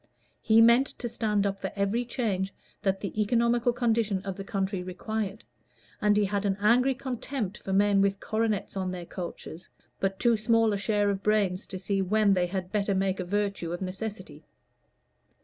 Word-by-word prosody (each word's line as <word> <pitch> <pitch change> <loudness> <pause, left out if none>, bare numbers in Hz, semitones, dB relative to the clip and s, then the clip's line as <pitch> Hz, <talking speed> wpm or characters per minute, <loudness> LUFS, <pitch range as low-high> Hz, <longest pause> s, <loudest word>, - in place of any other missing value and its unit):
He 225 0 +5
meant 235 +4 +6
to 240 - -4
stand 210 -3 0
up 195 0 -2
for 190 - -3
every 205 +5 0
change 200 -6 -1 0.3
that 195 -1 0
the 210 +1 -2
economical 235 +2 +2
condition 225 -5 0
of 195 -1 -4
the 195 - -6
country 195 -1 -2
required, 200 +3 -4 0.6
and 210 0 +3
he 210 - +3
had 200 +1 -1
an 195 -1 0
angry 250 +6 +4
contempt 255 -5 -4
for 195 - -6
men 200 0 +4
with 195 0 +1
coronets 220 -3 -1
on 190 -1 -2
their 180 -1 -5
coaches, 175 -1 -7 0.3
but 195 0 -1
too 235 0 +3
small 225 0 +3
a - - 0
share 205 0 +1
of 195 -1 -3
brains 205 -3 +1
to 190 - -5
see 195 +1 -1
when 205 +1 +3
they 180 -2 +1
had 185 0 -4
better 200 -2 0
make 190 0 0
a - - -1
virtue 200 -2 -2
of 175 - -4
necessity. 185 -5 -6
200 Hz, 185 wpm, -28 LUFS, 190-220 Hz, 0.6 s, meant